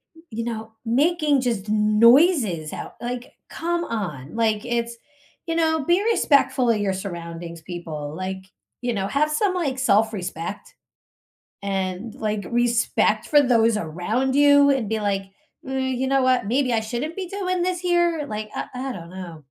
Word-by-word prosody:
m 325 Hz, -, -17 dB
you 230 Hz, +1 st, -3 dB
know, 225 Hz, -1 st, -5 dB
making 295 Hz, +3 st, +2 dB
just 225 Hz, -5 st, -2 dB
noises 215 Hz, -, +4 dB
out -, -, -7 dB
like, 245 Hz, +1 st, -5 dB, 0.2 s
come 345 Hz, +1 st, -2 dB
on, 155 Hz, -, -5 dB
like, 220 Hz, -2 st, +1 dB
it's 235 Hz, -1 st, -2 dB, 0.5 s
you 330 Hz, -, -1 dB
know, 320 Hz, -3 st, +1 dB
be 355 Hz, +6 st, +3 dB
respectful 275 Hz, -, +3 dB
of 215 Hz, -, +1 dB
your 200 Hz, -1 st, 0 dB
surroundings, 170 Hz, -3 st, -6 dB
people, 160 Hz, -4 st, -6 dB
like, 190 Hz, 0 st, -5 dB, 0.4 s
you 245 Hz, -, -1 dB
know, 195 Hz, -, -1 dB
have 300 Hz, +6 st, +1 dB
some, 370 Hz, +5 st, +1 dB
like, 295 Hz, -8 st, -1 dB
self-respect 205 Hz, -7 st, -1 dB, 0.9 s
and, 195 Hz, +2 st, -3 dB
like, 210 Hz, -2 st, -2 dB
respect 240 Hz, -1 st, +1 dB
for 295 Hz, -1 st, +6 dB
those 230 Hz, -4 st, +3 dB
around 210 Hz, +10 st, -1 dB
you 285 Hz, 0 st, +6 dB
and 265 Hz, -6 st, +1 dB
be, 220 Hz, 0 st, -1 dB
like, 195 Hz, -1 st, 0 dB, 0.4 s
uh, -, -, -5 dB
"You 260 Hz, -1 st, -1 dB
know 270 Hz, 0 st, +3 dB
what? 255 Hz, -3 st, +3 dB
Maybe 255 Hz, +3 st, +1 dB
I 230 Hz, -, +2 dB
shouldn't 245 Hz, -, -4 dB
be 380 Hz, -2 st, -3 dB
doing 370 Hz, -1 st, -2 dB
this 360 Hz, 0 st, -1 dB
here?" 345 Hz, -3 st, +1 dB
Like, 215 Hz, -3 st, -5 dB
I -, -, -3 dB
I 260 Hz, +1 st, -3 dB
don't 170 Hz, -4 st, -9 dB
know. 180 Hz, -3 st, -8 dB
235 Hz, 165 wpm, -23 LUFS, 200-285 Hz, 0.9 s, for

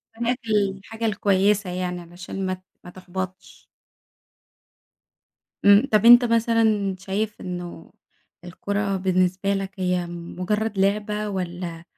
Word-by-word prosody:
هناك 235 Hz, +2 st, -1 dB
الحاجة 205 Hz, +2 st, -1 dB
الكويسة 200 Hz, -2 st, +2 dB
يعني 180 Hz, 0 st, -3 dB
علشان 175 Hz, +3 st, -7 dB
ما 185 Hz, -, -1 dB
ت 185 Hz, 0 st, -10 dB, 0.2 s
ما -, -, -10 dB
تحبطش. 185 Hz, 0 st, -8 dB, 2.0 s
امم 205 Hz, +4 st, +7 dB
طَب 215 Hz, 0 st, +3 dB
أنتَ 240 Hz, +1 st, +9 dB
مثلًا 225 Hz, -4 st, +2 dB
شايف 205 Hz, +3 st, -3 dB
إنه 175 Hz, -2 st, -7 dB, 0.5 s
الكورة 200 Hz, +2 st, -2 dB
بالنسبة 185 Hz, +1 st, +1 dB
لَك 195 Hz, -1 st, -3 dB
هي 180 Hz, -1 st, 0 dB
مجرّد 185 Hz, +5 st, -3 dB
لعبة 210 Hz, +2 st, 0 dB
والَّا 175 Hz, -3 st, -5 dB
195 Hz, 110 wpm, -23 LUFS, 180-210 Hz, 2.0 s, أنتَ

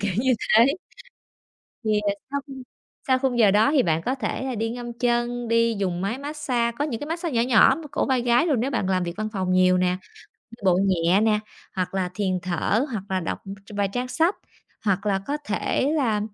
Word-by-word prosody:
kiểu 200 Hz, -2 st, -1 dB
như 255 Hz, 0 st, +3 dB
thế. 225 Hz, +3 st, +5 dB, 1.2 s
Thì, 215 Hz, -, 0 dB, 0.2 s
ờ, 200 Hz, -, +2 dB, 0.2 s
sau 280 Hz, 0 st, -1 dB
khi 275 Hz, -, -9 dB, 0.5 s
sau 260 Hz, -1 st, +3 dB
khung 255 Hz, -3 st, 0 dB
giờ 205 Hz, -3 st, +6 dB
đó 215 Hz, +7 st, +4 dB
thì 280 Hz, -5 st, +3 dB
bạn 165 Hz, -1 st, +1 dB
có 260 Hz, -, 0 dB
thể 265 Hz, -, -3 dB
là 260 Hz, -2 st, -3 dB
đi 225 Hz, +1 st, -1 dB
ngâm 240 Hz, 0 st, -6 dB
chân, 240 Hz, 0 st, -1 dB
đi 230 Hz, 0 st, +3 dB
dùng 180 Hz, -2 st, -1 dB
máy 215 Hz, +6 st, -2 dB
massage, 280 Hz, -5 st, -1 dB
có 290 Hz, -, +1 dB
những 235 Hz, -7 st, -4 dB
cái 290 Hz, -, -6 dB
massage 335 Hz, -2 st, -3 dB
nhỏ 230 Hz, -, +3 dB
nhỏ 220 Hz, -4 st, +6 dB, 0.2 s
cổ -, -, 0 dB
vai 260 Hz, -3 st, +1 dB
gáy, 240 Hz, +5 st, +3 dB
nếu 265 Hz, +4 st, -1 dB
bạn 190 Hz, -6 st, -1 dB
làm 185 Hz, -1 st, +1 dB
việc 170 Hz, -1 st, -4 dB
văn 215 Hz, 0 st, -2 dB
phòng 185 Hz, -2 st, -1 dB
nhiều 185 Hz, 0 st, +4 dB
nè, 180 Hz, 0 st, +1 dB, 0.5 s
đi 230 Hz, -, -14 dB
bộ 180 Hz, -1 st, +4 dB
nhẹ 180 Hz, +1 st, +3 dB
nè, 215 Hz, -1 st, +2 dB, 0.3 s
hoặc 185 Hz, 0 st, -2 dB
là 185 Hz, -2 st, -1 dB
thiền 185 Hz, -3 st, -1 dB
thở 185 Hz, -, 0 dB
hoặc 205 Hz, -4 st, -3 dB
là 185 Hz, -1 st, 0 dB
đọc 165 Hz, -, -3 dB, 0.3 s
tr -, -, -13 dB
vài 200 Hz, -1 st, +1 dB
trang 250 Hz, +1 st, -2 dB
sách. 330 Hz, +9 st, +1 dB, 0.5 s
Hoặc 200 Hz, 0 st, 0 dB
là 195 Hz, -1 st, +2 dB
có 290 Hz, -, -1 dB
thể 260 Hz, +6 st, 0 dB
là 225 Hz, -7 st, +1 dB
225 Hz, 220 wpm, -24 LUFS, 190-255 Hz, 1.2 s, giờ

